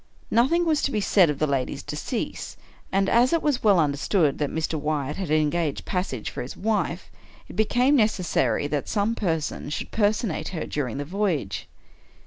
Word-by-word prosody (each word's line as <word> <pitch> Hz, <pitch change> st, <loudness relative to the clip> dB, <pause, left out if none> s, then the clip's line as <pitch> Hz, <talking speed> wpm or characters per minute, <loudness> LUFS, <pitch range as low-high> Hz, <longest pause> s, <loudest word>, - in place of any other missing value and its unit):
Nothing 300 Hz, +10 st, +3 dB
was 310 Hz, -2 st, +2 dB
to -, -, +1 dB
be 215 Hz, -, 0 dB
said 195 Hz, -4 st, +4 dB
of 150 Hz, -, -1 dB
the 155 Hz, -, +1 dB
lady's 135 Hz, -3 st, -2 dB
decease; -, -, -4 dB, 0.3 s
and, 195 Hz, 0 st, +2 dB
as 245 Hz, +6 st, +4 dB
it 335 Hz, -, +1 dB
was 290 Hz, -4 st, +1 dB
well 200 Hz, -4 st, +5 dB
understood 145 Hz, +1 st, +1 dB
that 145 Hz, -2 st, 0 dB
Mr. 160 Hz, 0 st, -2 dB
Wyatt 150 Hz, -1 st, -2 dB
had 190 Hz, -5 st, -4 dB
engaged 155 Hz, 0 st, +1 dB
passage 180 Hz, -, -3 dB
for -, -, -5 dB
his 125 Hz, -, -7 dB
wife, 195 Hz, -4 st, -1 dB, 0.4 s
it -, -, -11 dB
became 245 Hz, +7 st, +3 dB
necessary 180 Hz, -, +1 dB
that 145 Hz, -1 st, -2 dB
some 210 Hz, +1 st, +1 dB
person 165 Hz, -9 st, -2 dB
should 145 Hz, -, -4 dB
personate 205 Hz, -6 st, 0 dB
her 175 Hz, -4 st, -4 dB
during 135 Hz, -5 st, -3 dB
the 145 Hz, -, -3 dB
voyage. 185 Hz, -2 st, -2 dB
175 Hz, 175 wpm, -25 LUFS, 150-215 Hz, 0.4 s, well